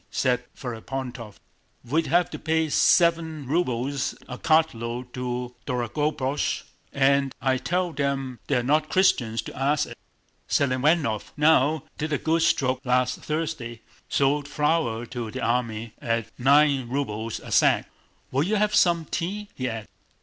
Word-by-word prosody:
said 125 -2 +1
Ferapóntov. 125 -2 -6 0.5
"We'd 155 +7 0
have 175 +3 +2
to - - -6
pay 160 0 +1
seven 165 -2 +3
rubles 135 -3 -1
a 125 -1 -7
cartload 125 -6 +1
to 125 -1 -4
Dorogobúzh 135 +3 -1 0.3
and 140 0 +2
I 130 -1 +1
tell 180 +2 -1
them 135 -3 -2
they're 120 - +1
not 150 +4 +2
Christians 120 -12 +2
to - - -9
ask 140 +3 +1
it! - - -9 0.5
Selivánov, 135 -3 +2
now, 155 0 +4 0.2
did 155 +1 -2
a - - +2
good 165 +4 +1
stroke 130 -4 +1
last 125 -1 +1
Thursday—sold 145 -1 -2
flour 145 -6 0
to 120 -2 -5
the - - -6
army 115 -2 -1
at 115 -1 -1
nine 140 -1 +4
rubles 115 -5 -3
a - - -10
sack. - - +4 0.4
Will 135 - +1
you 195 +8 +1
have 210 0 +1
some 170 -2 +3
tea?" 200 +7 -4
he 130 -1 -3
added. 110 -1 -6
135 Hz, 135 wpm, -25 LUFS, 125-155 Hz, 0.5 s, now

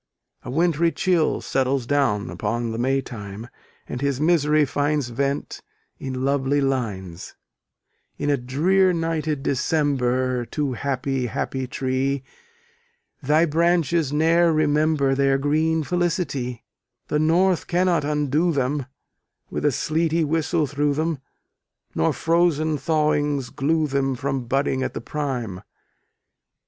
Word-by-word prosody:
A - - -9
wintry 165 +3 +2
chill 165 +2 +1
settles 130 -1 0
down 120 -7 +1
upon 115 +2 -2
the 115 - -4
May 135 +2 +1
time, 105 -2 -8 0.4
and 125 - -5
his 140 -2 0
misery 155 -2 +3
finds 145 -2 0
vent 140 +4 -2 0.4
in 130 -1 -3
lovely 140 0 +1
lines 105 -11 -3 0.8
In - - -3
a - - +4
drear 170 +9 +2
nighted 160 -4 -2
December, 130 -4 0
Too 145 -4 -2
happy, 135 0 -2
happy 130 +4 -3
tree, 130 +1 -1 1.0
Thy 150 +4 +3
branches 170 -2 +1
ne'er 165 +3 +3
remember 150 -2 +2
Their 135 0 +2
green 155 +3 +1
felicity: 155 -7 -2 0.5
The 150 - +1
north 175 +3 +2
cannot 175 -2 +2
undo 150 +3 +1
them, 140 -1 -1 0.6
With - - -3
a 150 - +3
sleety 160 +4 0
whistle 160 +1 0
through 145 0 0
them; 160 -1 -1 0.7
Nor - - +2
frozen 165 -2 +1
thawings 150 -4 0
glue 155 +3 +1
them 135 -2 0
From 135 -1 -3
budding 135 +1 0
at - - -3
the - - -4
prime. 125 -11 -4
145 Hz, 120 wpm, -23 LUFS, 130-160 Hz, 1.0 s, a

